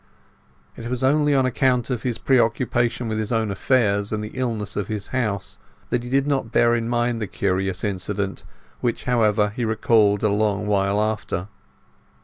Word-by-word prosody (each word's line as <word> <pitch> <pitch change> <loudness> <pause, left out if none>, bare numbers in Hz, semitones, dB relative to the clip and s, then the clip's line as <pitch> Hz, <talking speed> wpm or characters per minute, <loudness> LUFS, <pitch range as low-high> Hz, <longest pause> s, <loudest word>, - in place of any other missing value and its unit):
It 115 - -7
was 125 +1 -2
only 145 +2 +3
on 135 -1 +3
account 130 0 +1
of 120 -2 -2
his 120 -2 -2
preoccupation 120 -1 +1
with 110 0 -2
his 110 +1 -3
own 110 -3 0
affairs, 100 -2 +1
and 105 -1 -2
the 105 - -6
illness 115 -6 -3
in 105 - -1
his 105 -2 -4
house, 105 -7 -2 0.3
that 120 -1 0
he 120 - -7
did 135 +1 +2
not 135 -6 -1
bear 120 0 +4
in 115 -1 -1
mind 120 -1 0
the 105 - -2
curious 95 0 -1
incident, 100 0 -3 0.4
which, 120 - -2
however, 110 -4 +2
he 120 - -2
recalled 110 -2 +2
a 105 - +3
long 105 0 0
while 100 0 +1
after. 105 -3 -2
110 Hz, 175 wpm, -23 LUFS, 105-125 Hz, 0.4 s, bear